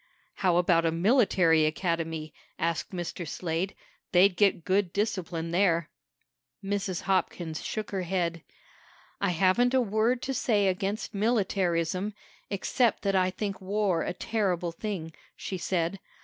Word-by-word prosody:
"How 180 -3 +2
about 175 -1 +3
a 165 - +2
military 170 - +4
academy?" 165 -1 -2 0.2
asked 165 -1 -1
Mr. 175 -2 -5
Slade. 170 +4 -2 0.4
"They'd 185 +1 +6
get 195 -5 +2
good 190 -1 +2
discipline 180 -6 -2
there." 170 -3 +2 0.7
Mrs. 195 -2 -2
Hopkins 175 -4 -1
shook 215 -1 -4
her 195 -2 -1
head. 170 -2 -1 0.8
"I - - +1
haven't 190 +9 +3
a - - +5
word 225 +3 +1
to 270 - -2
say 210 -6 +2
against 195 +5 -2
militarism, 195 -3 0 0.3
except 230 +4 +1
that 195 -1 +1
I 185 -1 +3
think 195 +1 -4
war 195 -3 0
a - - -2
terrible 180 -4 -1
thing," 165 -3 -5 0.2
she 190 - -5
said. 175 +1 -1
185 Hz, 135 wpm, -28 LUFS, 170-205 Hz, 0.8 s, They'd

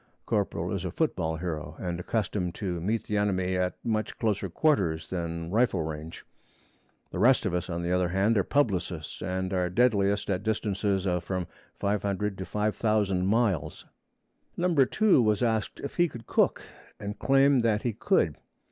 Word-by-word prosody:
(Corporal - - -1
is - - -2
a - - -2
football 80 0 -1
hero, 80 -2 -4
and 90 -2 -3
accustomed 95 -3 -2
to 90 -5 -3
meet 110 +6 0
the 105 - -2
enemy 95 -2 +1
at 90 0 0
much 110 -2 -1
closer 105 -4 -1
quarters 85 - +1
than 85 -2 -4
rifle 110 -6 +2
range. 80 +1 -7 0.9
The - - -4
rest 130 -2 +4
of 95 - 0
us, 90 0 -2
on 85 0 -3
the 85 - -1
other 90 0 +2
hand, 100 +5 +2
are 100 - +3
publicists, 95 - -1
and 95 0 -2
are 90 -1 +1
deadliest 100 -2 +2
at 90 -1 0
distances 100 -2 -1
of 90 -2 0
from 90 0 -2 0.3
500 100 0 -1
to 95 - -4
5000 105 -2 +1
miles.) 105 - 0 0.7
Number 170 -7 +3
2 215 -11 +4
was 105 -1 +2
asked 110 -2 0
if 140 - -6
he 175 0 +4
could 120 -7 -10
cook, - - +1 0.4
and 105 0 -6
claimed 135 -1 +4
that 110 -2 +1
he 120 - 0
could. - - +1
100 Hz, 165 wpm, -28 LUFS, 90-110 Hz, 0.9 s, rest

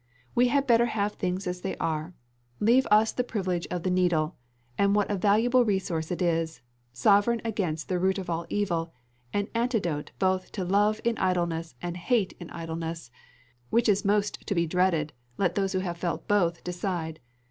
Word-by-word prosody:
We 245 +1 +4
had 280 +2 +2
better 235 -2 +4
have 210 -2 -1
things 185 +1 -2
as 180 0 -3
they 195 - -3
are: 160 +2 -2 0.4
leave 245 +5 +4
us 215 +1 +5
the 250 - -1
privilege 185 -7 -2
of 180 -1 -3
the 185 - 0
needle, 175 -3 +1 0.4
and 200 +6 +3
what 205 0 +1
a - - +1
valuable 225 +6 +4
resource 190 -7 -1
it 180 +1 -1
is; 165 -4 -1 0.3
sovereign 205 - +3
against 185 -8 -2
the 180 -1 0
root 190 +2 +2
of 190 - -5
all 170 0 -2
evil 170 -5 -1 0.4
an 205 0 -1
antidote 225 - -1
both 185 -1 0
to 190 -3 -3
love 205 +3 +2
in 235 -1 0
idleness 170 -3 0
and 175 0 -3
hate 195 +2 +1
in 175 - -8
idleness 165 -4 -5 0.6
which 235 0 +2
is 205 -1 +3
most 205 0 0
to 200 - 0
be 170 -1 +2
dreaded, 170 -3 +1 0.2
let 185 -3 +1
those 195 -1 0
who 185 - +1
have 170 -1 -3
felt 170 0 -3
both 175 -5 +2
decide. 175 -3 -3
185 Hz, 180 wpm, -27 LUFS, 170-205 Hz, 0.6 s, us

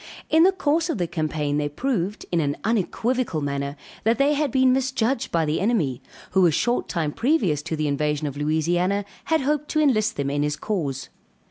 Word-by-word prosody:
In 320 - +5
the 370 +3 +6
course 330 -2 0
of 315 - -1
the 175 - 0
campaign 155 -3 -2
they 145 0 -1
proved, 210 - -2
in 170 - +2
an 145 -1 -1
unequivocal 225 -1 0
manner, 140 0 -3 0.3
that 225 +1 +2
they 280 +3 +3
had 295 0 0
been 260 0 +4
misjudged 260 -2 0
by 165 -1 +2
the 150 +1 0
enemy, 190 - 0 0.3
who 185 -1 +5
a - - +3
short 240 +10 0
time 160 -4 -1
previous 210 - +1
to 160 +1 -4
the 155 -1 -1
invasion 150 +1 0
of 140 -2 -4
Louisiana, 175 +7 0 0.2
had 320 -2 +2
hoped 295 +2 0
to 310 - 0
enlist 235 -7 +2
them 140 -1 -2
in 145 0 0
his 150 0 0
cause. 150 -7 -3
180 Hz, 200 wpm, -24 LUFS, -, 0.3 s, the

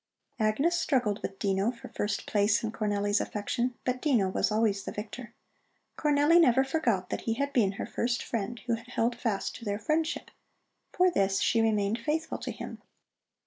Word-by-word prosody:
Agnes 275 +11 +2
struggled 245 -10 +1
with 195 - -5
Dino 195 +2 +1
for 240 -1 -7
first 205 0 -2
place 205 +1 +2
in 220 - -1
Cornelli's 205 -1 0
affection, 240 +4 -2
but 255 0 -1
Dino 235 -11 +2
was 190 - 0
always 215 -2 +2
the - - -5
victor. 230 +3 -7 0.6
Cornelli 300 +3 +4
never 265 -3 +5
forgot 240 - 0
that - - -2
he 225 - +1
had 280 +3 -2
been 205 -6 +3
her - - -4
first 240 0 -1
friend, 230 +1 -3
who 235 - 0
had 230 +1 -4
held 240 -1 0
fast 225 -4 -2
to - - -12
their 205 -2 -1
friendship. 310 +9 -1 0.6
For 365 0 +3
this 195 - +1
she 230 - +3
remained 215 0 +1
faithful 315 +4 -2
to - - -4
him. - - -8
230 Hz, 180 wpm, -29 LUFS, 205-260 Hz, 0.6 s, never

